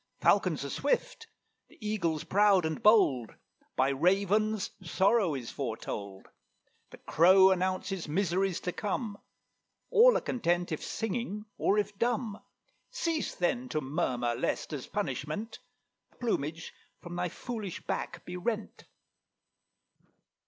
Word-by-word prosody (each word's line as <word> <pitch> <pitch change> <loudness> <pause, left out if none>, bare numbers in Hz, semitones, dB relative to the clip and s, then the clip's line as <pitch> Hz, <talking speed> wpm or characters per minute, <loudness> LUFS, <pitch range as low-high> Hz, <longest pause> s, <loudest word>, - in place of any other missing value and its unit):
Falcons - - +2
are - - -5
swift; - - -1 0.4
the - - -21
Eagle's 180 -8 -1
proud 200 -3 +4
and 160 -1 -2
bold; 145 - +4 0.4
By 130 +1 +3
Ravens 195 +7 +1
sorrow 190 0 +2
is 120 -4 -6
foretold; 105 -6 -5 0.6
The - - -12
Crow 190 +3 +6
announces 185 -1 -1
miseries 185 +2 0
to 180 - -2
come; 210 +1 -3 0.7
All - - +7
are - - -2
content 175 -7 0
if 155 - -3
singing 220 -1 -3
or 205 - +2
if 205 -1 -1
dumb. 230 -3 -1 0.5
Cease, 335 -11 -2
then, 245 +8 -1
to 155 - 0
murmur, 130 -5 -1
lest, - - -2
as - - -5
punishment, 205 +11 -4 0.5
The - - -29
plumage 165 - -2 0.3
from 175 0 -8
thy 180 0 -1
foolish 215 -2 -6
back 175 - -4
be 180 - -6
rent." 220 +3 -4
190 Hz, 125 wpm, -30 LUFS, 160-215 Hz, 0.7 s, All